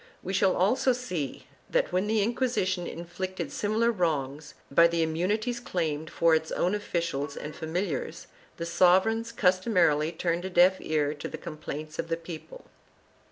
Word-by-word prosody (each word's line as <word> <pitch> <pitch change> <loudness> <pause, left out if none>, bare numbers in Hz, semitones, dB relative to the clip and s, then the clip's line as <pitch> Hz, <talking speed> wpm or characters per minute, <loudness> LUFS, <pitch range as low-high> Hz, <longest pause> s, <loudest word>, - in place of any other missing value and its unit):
We 190 - -4
shall 195 -1 +3
also 235 +7 +3
see 180 - -4 0.2
that, - - +1
when 185 +3 +1
the 215 -1 +2
Inquisition 200 -6 0
inflicted 185 +3 -5
similar 220 +3 +1
wrongs 150 - -2 0.2
by 170 +4 +7
the 170 -1 +1
immunities 205 +9 -1
claimed 160 -8 -2
for 165 -1 +3
its 160 0 +1
own 180 +3 +1
officials 165 -8 -2
and 150 - -6
familiars, 160 -2 -3 0.3
the 170 - -3
sovereigns 190 +7 +3
customarily 180 -7 +2
turned 170 0 -1
a 190 - -3
deaf 180 +1 +5
ear 150 -2 0
to 145 - -6
the - - -6
complaints 155 -1 -7
of - - -1
the 165 0 -1
people. 170 - -9
175 Hz, 155 wpm, -28 LUFS, 160-200 Hz, 0.3 s, by